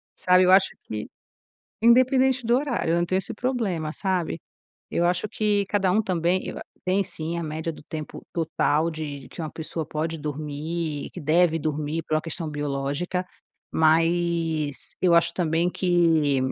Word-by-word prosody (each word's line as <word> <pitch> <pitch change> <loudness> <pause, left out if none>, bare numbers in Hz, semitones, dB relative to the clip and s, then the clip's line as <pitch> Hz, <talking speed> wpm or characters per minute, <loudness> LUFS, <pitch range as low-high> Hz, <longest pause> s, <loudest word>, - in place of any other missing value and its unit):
Sabe, 185 0 +4
eu 185 - +5
acho 190 0 +6
que 105 -1 -5 0.7
independente 255 +2 +4
do 235 +1 +3
horário, 255 - 0
eu - - +3
não 175 - +1
tenho 185 +2 +1
esse 230 +3 -6
problema, 200 -12 -1
sabe. 180 -4 -1 0.5
Eu 175 - +1
acho 180 +4 +1
que 210 -1 +1
cada 195 -3 +2
um 215 +4 +3
também 180 -1 0
eu - - -5
a - - -7 0.2
tem 185 +2 +2
sim 165 +1 -4
a 170 - -3
média 160 +1 -3
do 150 - -13
tempo 155 0 -7
total 160 -1 +1
de 145 -4 -6
que - - -9
uma 155 - -4
pessoa 160 0 -5
pode 160 +2 -2
dormir, 150 +1 -4
que - - -7
deve 165 +2 +3
dormir 155 +1 -2
por 155 - -2
uma 155 - +2
questão 165 0 -5
biológica, 145 +5 -2 0.5
mas 165 -2 +1
eu 180 -2 +5
acho 170 0 +3
também 170 0 +1
que 165 -7 +2
170 Hz, 165 wpm, -25 LUFS, 155-185 Hz, 0.7 s, acho